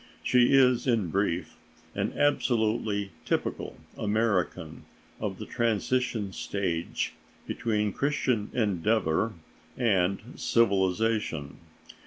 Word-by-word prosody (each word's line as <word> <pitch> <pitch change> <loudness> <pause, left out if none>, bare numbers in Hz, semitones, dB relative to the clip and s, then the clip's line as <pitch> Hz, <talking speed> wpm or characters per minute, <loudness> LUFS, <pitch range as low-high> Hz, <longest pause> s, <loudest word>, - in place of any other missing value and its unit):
She 125 +1 +4
is, 130 -1 +4
in 110 -8 +2
brief, 95 -2 -1 0.4
an - - -2
absolutely 110 -7 +1
typical - - -2 0.2
American 100 -6 -1 0.3
of - - -3
the - - -6
transition 115 -2 0
stage 90 -5 -2 0.3
between 105 -3 -1
Christian 130 -7 0
Endeavor 105 -1 +1 0.4
and 100 -5 +2 0.2
civilization. 100 -7 +1
105 Hz, 85 wpm, -28 LUFS, 95-115 Hz, 0.4 s, She